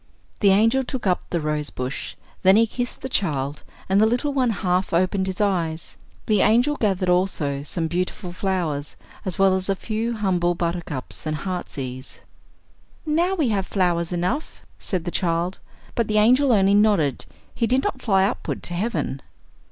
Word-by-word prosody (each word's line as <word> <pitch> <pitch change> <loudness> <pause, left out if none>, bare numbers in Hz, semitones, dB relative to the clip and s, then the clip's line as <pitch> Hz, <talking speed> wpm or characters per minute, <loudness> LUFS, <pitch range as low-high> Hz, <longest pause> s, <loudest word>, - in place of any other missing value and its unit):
The 200 - +5
angel 225 +7 +4
took 255 -2 -5
up 180 -2 +2
the 170 - 0
rose 150 -1 -1
bush; 130 +2 -5 0.3
then 190 +1 +6
he 225 +2 +5
kissed 245 +2 -4
the 265 - -3
child, 145 - -1 0.3
and 195 +2 +3
the 220 - +5
little 250 +5 0
one 260 -3 +2
half 180 -3 0
opened 185 +2 +1
his 190 -1 -4
eyes. 170 -6 -1 0.3
The 210 -3 +3
angel 245 +7 +4
gathered 195 -7 0
also 180 -6 +1
some 165 +3 -2
beautiful 180 +2 -3
flowers, 175 -7 -2 0.3
as 185 - -2
well 195 -1 +4
as 190 +1 -2
a 195 - +2
few 225 +4 -2
humble 180 -5 +1
buttercups 170 -5 -4
and 155 - -1
heart's 180 +1 -5
ease. 130 0 -7 0.8
"Now 340 +5 +1
we 305 -9 +1
have 195 -3 0
flowers 175 -3 0
enough," 180 - -2 0.2
said 180 -4 -3
the 175 - -2
child; 170 +1 -1 0.3
but 235 - 0
the 215 - +1
angel 250 +6 +5
only 200 -3 +4
nodded, 205 -9 +3 0.3
he 230 - 0
did 255 +3 +2
not 260 - -2
fly 195 -4 +3
upward 200 - -3
to 175 - -3
heaven. 170 - -2
190 Hz, 175 wpm, -23 LUFS, 170-220 Hz, 0.8 s, then